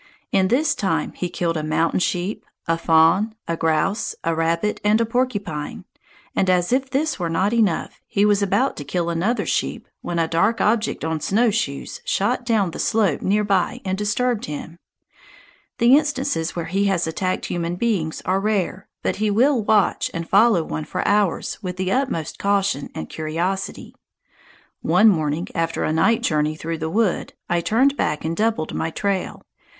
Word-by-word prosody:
In 190 -1 +3
this 285 +7 +2
time 200 -8 -1
he 180 - -3
killed 170 -1 -1
a - - -1
mountain 160 +3 +1
sheep, 180 +2 -1 0.2
a 165 - +2
fawn, 165 +6 +3
a 170 - -1
grouse, 165 +6 0
a 165 - +1
rabbit, 165 +5 0
and 210 +1 +3
a 230 - +2
porcupine; 215 -6 -2 0.5
and 190 - +2
as 180 +3 +2
if 265 0 +1
this 275 -1 -1
were 170 -2 -1
not 190 +6 +1
enough, 215 -8 0
he 200 +1 +2
was 205 -1 +3
about 250 +7 +1
to 145 - -5
kill 170 +3 -2
another 190 +9 0
sheep - - -2
when 175 - -3
a 165 -1 +2
dark 195 +8 +1
object 215 -6 +1
on 160 -1 -1
snowshoes 205 - 0
shot 245 +5 0
down 210 -6 +2
the - - -8
slope 210 -9 +1
near 210 +2 +2
by 195 -3 +1
and 190 0 0
disturbed 215 +3 0
him. 160 +3 -7 1.0
The 240 +3 +6
instances 275 - 0
where 170 -2 -3
he 195 +4 0
has 190 -3 +1
attacked 185 +3 -2
human 170 0 -2
beings 180 -7 -1
are 185 +2 +1
rare, 195 -2 -1 0.2
but - - -1
he 215 +1 +1
will 245 +5 +3
watch 210 -1 +2
and 165 0 -4
follow 200 -3 +4
one 155 -1 -4
for 180 +4 -3
hours 205 -2 +1
with 180 -3 -5
the 185 0 -1
utmost 255 - -1
caution 195 -7 0
and 80 - -5
curiosity. 170 +5 -3 0.9
One 220 +1 +5
morning 155 -2 0
after 165 0 -1
a 155 - 0
night 225 +8 +2
journey 155 -1 +1
through 165 +1 -4
the 160 0 -2
wood, 210 0 0
I 175 0 +1
turned 260 +10 +2
back 150 0 -1
and 165 +1 -1
doubled 215 -6 0
my 160 - -1
trail. 195 +2 -2
190 Hz, 175 wpm, -22 LUFS, 165-220 Hz, 1.0 s, The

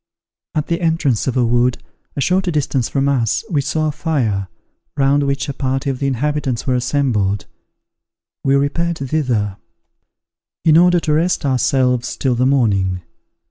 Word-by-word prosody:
At 150 -1 0
the 170 0 -2
entrance 160 -9 +1
of 130 - 0
a 125 - +3
wood, 120 +1 +2 0.4
a 140 - -2
short 185 +7 +1
distance 145 -7 0
from 140 0 0
us, 130 - 0
we 145 -4 +2
saw 155 +3 -1
a - - -1
fire, 135 - -1 0.5
round 140 +1 +3
which 140 0 -1
a 140 - -3
party 135 +1 -1
of 130 - -6
the 140 - 0
inhabitants 135 -1 -1
were 130 - +1
assembled. 120 -6 0 1.0
We 135 0 +3
repaired 165 +5 0
thither, 125 -9 -1 1.1
in 155 -2 +6
order 175 +1 +5
to 155 - 0
rest 165 +1 +1
ourselves 130 -1 +1
till 130 -2 +1
the 125 +2 +1
morning. 100 -9 +1
135 Hz, 155 wpm, -18 LUFS, 120-150 Hz, 1.1 s, in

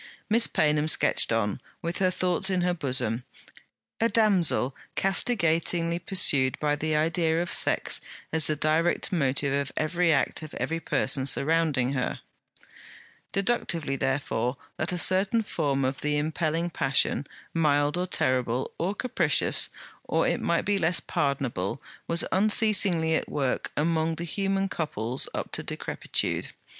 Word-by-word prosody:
Miss 230 +1 +5
Paynham 150 0 +1
sketched 160 - +3
on, 110 -3 -1 0.2
with 170 +1 -3
her 185 -1 +3
thoughts 185 +1 0
in 185 -2 0
her 180 0 +1
bosom: 130 -7 -1 0.8
a 230 - +2
damsel 190 - +2 0.2
castigatingly 170 -4 +1
pursued 145 -7 +2
by 150 -1 +1
the 155 +1 -1
idea 160 +1 +1
of 175 - -2
sex - - +2 0.3
as 160 -2 +4
the 155 - +1
direct 155 +6 +1
motive 140 -4 +1
of 140 -1 -1
every 170 +2 +1
act 145 - 0
of 155 -1 -9
every 165 +1 -2
person 135 -4 0
surrounding, 140 -3 +3
her; 125 -2 -2 1.1
deductively 190 -9 -1
therefore 135 -2 -1 0.2
that 160 - -2
a 180 - -2
certain 190 +7 +4
form 140 -8 -1
of 135 +1 -2
the 150 0 0
impelling 160 +2 -1
passion, 135 0 0 0.3
mild 145 -2 +2
or 180 +1 -2
terrible, 130 -5 0
or 185 +5 -1
capricious, 175 - +1 0.4
or - - +1
it - - 0
might 170 0 0
be 205 0 +1
less 170 0 +2
pardonable, 135 -7 -2 0.3
was 170 +1 +2
unceasingly 200 -5 +2
at - - -1
work 135 -3 -2
among 160 +1 +1
the 170 - -5
human 195 +2 -1
couples 130 - -3
up - - -4
to - - -3
decrepitude. - - -2
160 Hz, 140 wpm, -26 LUFS, 140-180 Hz, 1.1 s, Miss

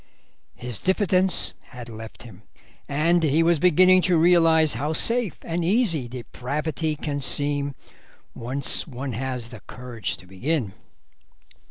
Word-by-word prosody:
His 120 -4 -4
diffidence 190 -1 +1
had 125 -2 -12
left 110 -1 -10
him, 105 -5 -13 0.5
and 165 +5 +2
he 155 +1 +2
was 170 -1 +3
beginning 185 +2 +5
to 175 - +4
realise 165 -2 +4
how 145 +7 -2
safe 230 +3 +2
and 170 +1 -2
easy 175 - +1
depravity 150 +6 -4
can 145 -1 -4
seem 145 0 0 0.6
once 130 +7 -1
one 130 -2 -6
has 125 -1 -4
the 110 - -9
courage 125 -3 -5
to - - -15
begin. 105 - -2
145 Hz, 130 wpm, -24 LUFS, 125-170 Hz, 0.6 s, beginning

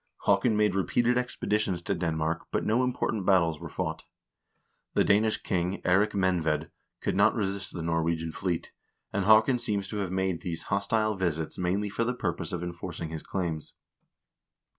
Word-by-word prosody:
Haakon 100 +2 +3
made 105 -2 +3
repeated 120 +5 +2
expeditions 105 -6 0
to 100 - 0
Denmark, 80 -2 -1
but - - -1
no 115 +4 +2
important 120 -4 -1
battles 85 -5 +3
were - - -7
fought. - - -4 0.9
The - - +5
Danish 105 +2 +3
king, 90 0 -1
Eirik 95 +4 +3
Menved, 90 -5 +1 0.3
could - - -1
not 100 +3 +4
resist 100 -3 -2
the 85 - -4
Nor 80 0 +1
wegian 80 -1 -1
fleet, 90 -3 -2 0.4
and 100 -1 0
Haakon 110 +4 +6
seems 105 -5 -1
to 105 - -4
have 95 -3 -2
made 95 -2 -1
these 85 -2 -4
hostile 110 +2 +1
visits 85 -5 -2
mainly 95 +3 0
for 115 - 0
the 125 +2 -1
purpose 85 -6 -2
of 90 -1 -3
enforcing 85 -1 -5
his 80 -1 -5
claims. 85 -5 -3
95 Hz, 165 wpm, -28 LUFS, 85-105 Hz, 0.9 s, Haakon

